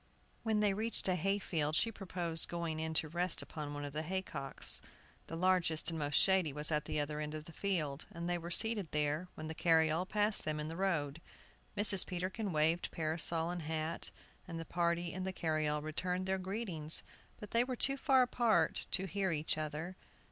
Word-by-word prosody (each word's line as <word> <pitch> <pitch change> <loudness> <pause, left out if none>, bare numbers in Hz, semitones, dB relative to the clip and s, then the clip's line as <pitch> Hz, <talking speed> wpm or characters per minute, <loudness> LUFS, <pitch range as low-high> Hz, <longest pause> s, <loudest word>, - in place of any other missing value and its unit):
When 220 -2 +1
they 205 -2 +3
reached 220 +1 +2
a 185 - +3
hay 195 +3 +1
field, 155 -6 -1
she 230 - +3
proposed 175 -5 -1
going 170 -2 -2
in 160 0 -2
to 155 - +2
rest 175 +3 +1
upon 145 -2 -6
one 145 0 -4
of 145 - -6
the 155 - -1
hay 190 +4 -2
cocks. 135 -6 -2 0.5
The 165 - -5
largest 170 -2 +2
and 165 - -3
most 145 -1 -1
shady 190 -5 +4
was 150 +3 -2
at 150 -1 +1
the - - -1
other 150 +1 -2
end 150 0 -3
of 155 0 -6
the 170 - -10
field, 155 -6 -2
and 170 -2 -5
they 175 0 0
were 170 +1 -6
seated 210 -1 0
there 150 +3 0
when 155 - -6
the 160 - -4
carryall 160 +1 +3
passed 210 +1 +1
them 155 -1 -1
in 150 +1 -3
the 165 - -5
road. 165 -5 0 0.6
Mrs. 200 -2 +7
Peterkin 190 +3 -2
waved 160 +2 +2
parasol 165 +1 +1
and 175 -1 -4
hat, 160 +1 -2 0.4
and 165 -2 -5
the 165 - -5
party 170 0 0
in 185 - -3
the 190 - -2
carryall 155 -4 0
returned 180 +4 -2
their 190 0 0
greetings, 185 -5 -2 0.4
but 210 - -9
they 235 +1 +4
were 255 0 -3
too 275 +3 +2
far 270 -2 +4
apart 230 -9 +2
to 190 - +2
hear 195 -1 0
each 155 -1 0
other. 155 +4 -4
170 Hz, 205 wpm, -35 LUFS, 155-190 Hz, 0.6 s, Mrs